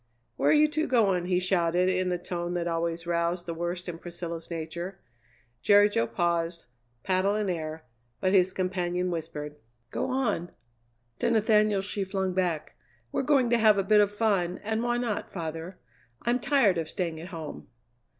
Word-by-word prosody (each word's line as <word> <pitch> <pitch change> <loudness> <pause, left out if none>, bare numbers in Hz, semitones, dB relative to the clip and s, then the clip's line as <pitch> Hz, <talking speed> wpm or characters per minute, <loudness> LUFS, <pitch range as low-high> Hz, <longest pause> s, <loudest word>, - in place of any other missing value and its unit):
"Where - - +3
you 305 0 +6
two 310 +1 -1
going?" 195 -8 +2
he 180 -1 +2
shouted 180 -1 +2
in 185 0 +1
the 180 - 0
tone 175 0 -4
that 175 -1 -1
always 165 0 -2
roused 170 +1 0
the 170 - -3
worst 175 +2 -4
in 170 -2 -5
Priscilla's 170 -1 -6
nature. 170 +3 -5 0.6
Jerry 205 0 +6
Jo 115 - +1
paused, 170 +6 -1 0.4
paddle 190 +2 +1
in 210 -3 0
air, 160 -2 -5 0.3
but 185 +1 +1
his 185 -1 +4
companion 180 -1 -1
whispered: 150 -3 -5 0.3
"Go - - -2
on!" 235 -10 0 0.7
To - - +1
Nathaniel 215 -2 +3
she 200 0 -3
flung 190 -1 -2
back: 175 -4 -1 0.4
"We're - - 0
going 265 -3 +3
to 235 - +4
have 215 -2 +5
a 195 - +2
bit 210 +1 +5
of 205 -1 +2
fun, 200 -5 +1
and 220 +1 -1
why 240 0 0
not, 235 -4 -2
father? 165 +1 -5 0.5
I'm 240 +1 +1
tired 235 - +3
of 160 -1 -4
staying 170 -4 -3
at 170 - -8
home." 165 -5 -7
180 Hz, 170 wpm, -28 LUFS, 170-205 Hz, 0.7 s, you